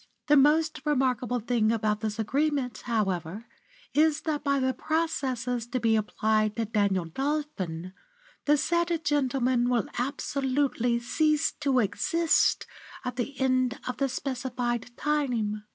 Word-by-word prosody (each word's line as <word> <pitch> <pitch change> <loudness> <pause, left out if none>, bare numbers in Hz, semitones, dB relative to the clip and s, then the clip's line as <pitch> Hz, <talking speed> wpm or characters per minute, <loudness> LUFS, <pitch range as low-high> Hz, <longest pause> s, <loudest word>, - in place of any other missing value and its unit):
The 295 - +5
most 310 +3 +3
remarkable 255 -4 +1
thing 225 -1 +1
about 215 -2 0
this 215 -1 -3
agreement, 270 +3 -1
however, 200 -3 -1 0.5
is 310 +1 +3
that 305 -3 -2
by 280 -1 +2
the 260 0 +1
processes 255 -6 -1
to 255 +1 -2
be 225 -1 +3
applied 215 0 +1
to 230 - -1
Daniel 200 -4 +1
Dolphin, 190 - -3 0.5
the 295 0 +4
said 340 +1 0
gentleman 260 -5 +1
will 240 -4 +1
absolutely 265 -2 0
cease 305 +5 +1
to 280 -3 +1
exist 330 - +2 0.4
at 250 - -3
the 265 +2 -4
end 255 -1 +1
of 250 - -3
the 275 -1 0
specified 250 -2 -3
time. 240 -8 -1
255 Hz, 130 wpm, -27 LUFS, 225-290 Hz, 0.5 s, The